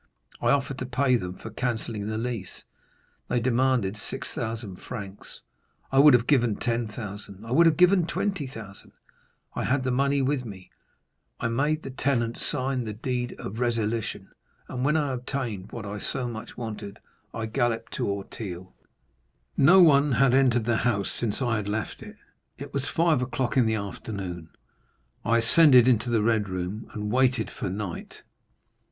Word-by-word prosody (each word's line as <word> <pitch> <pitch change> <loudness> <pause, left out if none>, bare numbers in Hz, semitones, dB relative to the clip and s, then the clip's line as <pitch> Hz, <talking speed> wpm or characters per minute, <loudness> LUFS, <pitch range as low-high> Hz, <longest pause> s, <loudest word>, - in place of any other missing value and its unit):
I - - 0
offered 135 -1 +1
to 125 - -4
pay 130 0 +2
them 90 -5 -3
for 110 - -9
cancelling 110 -3 -3
the 110 0 -2
lease; 115 -5 -4 0.6
they 125 - +1
demanded 120 -4 +1
6,000 110 -1 -4
francs. 100 -4 -8 0.5
I 135 - +4
would 145 -2 +8
have 120 -1 +2
given 120 -7 +3
10,000—I 110 -2 -4
would 165 +6 +6
have 160 - +3
given 180 -1 +5
20,000. 130 - -4 0.6
I - - -2
had 130 +1 +1
the 130 - 0
money 140 +2 +2
with 135 -1 0
me; 95 -6 -10 0.7
I 115 - -1
made 150 +6 0
the 135 - -6
tenant 120 -3 0
sign 130 -2 -1
the 105 - -4
deed 125 +1 -3
of 110 +4 -6
resilition, 115 -4 -1 0.4
and 125 -1 -4
when 150 +3 +3
I 145 -2 0
had 130 -2 -2
obtained 120 -7 -4
what 115 -3 -6
I 105 +1 -5
so 125 +4 -2
much 115 -2 -7
wanted, 105 -3 -6 0.3
I 115 - -4
galloped 115 +1 -1
to - - -1
Auteuil. 95 -2 -5 0.8
No 175 +7 +7
one 145 -3 +5
had 130 +1 +4
entered 125 -4 +3
the 120 -1 +2
house 100 -6 0
since 115 +2 -1
I 120 -3 +1
had 105 -1 -3
left 110 +1 -3
it. - - -10 0.4
"It - - -9
was 140 0 -1
five 165 -5 +2
o'clock 125 0 -2
in 125 -4 +4
the 110 - +1
afternoon; 95 -4 -5 0.7
I 115 0 +3
ascended 125 +1 +6
into 120 -1 +3
the 115 -3 +2
red 110 -3 +1
room, 95 +4 -4
and 105 -2 -3
waited 125 -2 +2
for - - -4
night. 95 -2 -6
120 Hz, 165 wpm, -26 LUFS, 105-130 Hz, 0.8 s, would